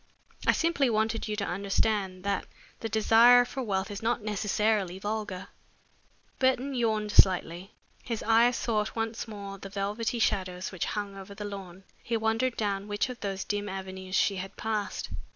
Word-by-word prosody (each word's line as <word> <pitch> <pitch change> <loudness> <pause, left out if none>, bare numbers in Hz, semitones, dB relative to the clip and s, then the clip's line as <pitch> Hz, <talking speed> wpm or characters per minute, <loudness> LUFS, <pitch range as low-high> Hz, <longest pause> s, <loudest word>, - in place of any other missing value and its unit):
I - - +8
simply 325 -6 +2
wanted 220 0 0
you 215 - -2
to 205 -1 -2
understand 195 0 0
that 200 0 -1 0.3
the 225 - -4
desire 230 +3 +6
for 265 +2 -5
wealth 200 -3 -1
is 200 - -5
not 230 0 0
necessarily 210 -2 0
vulgar." 205 -2 -4 0.9
Burton 260 +1 +2
yawned 220 -4 0
slightly. 185 0 +3 0.3
His 230 -3 -4
eyes 230 +2 +4
sought 215 -3 -1
once 225 +1 -2
more 200 -2 -7
the 195 - -8
velvety 205 +4 -2
shadows 185 -4 0
which 185 -4 -2
hung 200 -1 -3
over 195 +1 -9
the 210 0 -6
lawn. 195 -2 -8 0.2
He 235 -1 -1
wondered 225 +3 0
down 200 -2 -1
which 205 +4 -1
of 250 -1 -7
those 195 -1 -3
dim 205 0 -2
avenues 190 0 -5
she 195 0 +3
had 190 +1 -6
passed. 215 -2 -3
210 Hz, 165 wpm, -29 LUFS, 195-225 Hz, 0.9 s, I